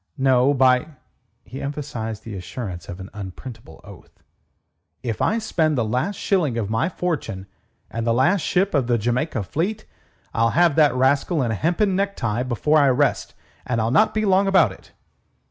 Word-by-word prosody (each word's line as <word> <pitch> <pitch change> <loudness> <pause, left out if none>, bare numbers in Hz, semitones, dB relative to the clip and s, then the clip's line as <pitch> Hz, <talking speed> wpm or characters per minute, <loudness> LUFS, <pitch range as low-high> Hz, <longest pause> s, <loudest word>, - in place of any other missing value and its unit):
"No, 130 0 +3
by....." 130 0 +3 0.6
He 135 - -9
emphasized 120 -7 -5
the 115 - -8
assurance 95 0 -6
by 100 - -6
an 95 +2 -10
unprintable 105 -1 -9
oath. 100 -4 -16 0.8
"If 115 -4 -3
I 220 - +2
spend 160 -9 0
the 115 - +1
last 130 - -1
shilling 165 - 0
of 110 -2 -2
my 115 +10 +1
fortune 145 - -3 0.5
and 115 - -3
the - - +3
last 135 +11 +3
ship 190 +5 +1
of 135 -5 +1
the 120 -1 +2
Jamaica 120 +2 -1
fleet, 190 - -3 0.5
I'll 115 0 +2
have 170 -4 +4
that 150 -5 +4
rascal 140 +4 +2
in 120 - -1
a - - 0
hempen 180 - +1
necktie 185 - -1
before 130 +5 +1
I 140 -2 +4
rest. 140 +3 0 0.3
And 120 -2 -2
I'll 115 +1 0
not 215 - +3
be 215 0 +1
long 195 0 +3
about 185 - +4
it." - - -15
130 Hz, 175 wpm, -22 LUFS, 115-165 Hz, 0.8 s, have